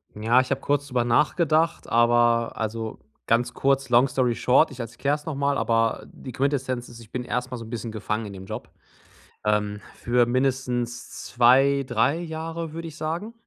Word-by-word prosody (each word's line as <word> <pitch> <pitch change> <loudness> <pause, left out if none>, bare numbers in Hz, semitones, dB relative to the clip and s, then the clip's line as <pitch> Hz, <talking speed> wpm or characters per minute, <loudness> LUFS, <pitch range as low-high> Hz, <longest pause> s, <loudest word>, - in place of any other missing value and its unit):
Ja, 115 +4 +3
ich 130 - -6
habe 135 - 0
kurz 145 0 0
drüber 125 -3 0
nachgedacht, 155 +6 +2
aber 120 0 +3
also 110 0 -4 0.3
ganz 120 +2 +2
kurz, 135 0 +1
long 120 +2 +5
Story 130 -3 +1
short, 130 +7 +3
ich 130 - -11
erklär's 140 +6 -2
noch 160 - -3
mal. 140 0 +1
Aber 115 -2 +1
die 130 - -9
Quintessenz 130 -1 -1
ist: 120 - -12
Ich 115 -2 -15
bin 125 - -3
erst 125 +1 -3
mal 125 - -4
so 115 - -8
'n - - -11
bisschen 115 -1 -5
gefangen 110 0 -3
in 100 - -8
dem 95 -1 -9
Job. - - -7 0.7
Ähm, 105 -1 0
für 120 0 +2
mindestens 125 -1 -2
2, 135 +3 +4
3 125 +7 +1
Jahre, 165 0 -5
würde 165 +1 -6
ich 155 - -10
sagen. 170 +8 -4
125 Hz, 185 wpm, -25 LUFS, 115-140 Hz, 0.7 s, long